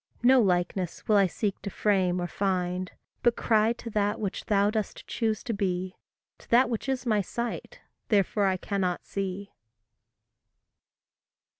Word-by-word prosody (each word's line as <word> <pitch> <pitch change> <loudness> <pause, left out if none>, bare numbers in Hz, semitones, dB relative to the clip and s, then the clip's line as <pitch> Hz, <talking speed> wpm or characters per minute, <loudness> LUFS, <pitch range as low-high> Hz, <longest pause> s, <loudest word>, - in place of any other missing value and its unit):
No 255 +1 +6
likeness 180 -2 -1
will 215 - +5
I 195 -1 +5
seek 200 +2 -3
to 200 - -4
frame 185 -3 +1
or 175 - -1
find, 180 -1 -1 0.3
But 240 -1 +3
cry 220 0 +3
to 235 -1 -8
that 210 +1 0
which 200 -3 -3
thou 205 0 +3
dost 215 -1 -3
choose 220 -2 -1
to 235 - -2
be, 185 -2 -2 0.4
To - - -19
that 245 +1 +4
which 230 +4 -3
is 265 -1 -1
my 215 -3 +2
sight, 240 - -5 0.3
therefore 205 -1 +2
I 190 -1 +1
cannot 185 -2 -2
see. 195 0 -4
200 Hz, 150 wpm, -28 LUFS, 185-225 Hz, 0.4 s, No